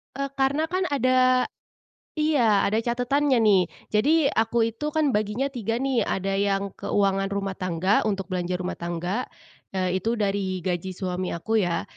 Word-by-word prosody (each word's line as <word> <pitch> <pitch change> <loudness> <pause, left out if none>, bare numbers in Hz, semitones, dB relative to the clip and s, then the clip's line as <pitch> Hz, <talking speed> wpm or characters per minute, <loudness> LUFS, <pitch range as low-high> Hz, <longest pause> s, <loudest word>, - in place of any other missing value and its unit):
Eee, 275 0 -2
karena 280 +4 +1
kan 370 +2 -1
ada 255 -1 +3 0.7
iya 265 -10 +3
ada 215 +2 +1
catatannya 250 +3 +1
nih. 200 -4 +5 0.3
Jadi 225 +10 +3 0.2
aku 225 +1 +1
itu 265 +7 -6
kan 305 -3 +2
baginya 215 +5 -1
3, 230 -3 -3
nih 260 -5 +1
ada 195 +1 -1
yang 200 0 0
keuangan 195 -1 +1
rumah 195 -1 -3
tangga 185 +4 +1
untuk 195 -2 -2
belanja 180 0 -2
rumah 180 0 -4
tangga, 175 +7 -3 0.5
nah 185 -1 0
itu 220 +6 0
dari 195 -3 -1
gaji 180 0 -2
suami 185 0 -3
aku 220 +6 0
ya. 170 - -1
210 Hz, 155 wpm, -25 LUFS, 190-255 Hz, 0.7 s, nih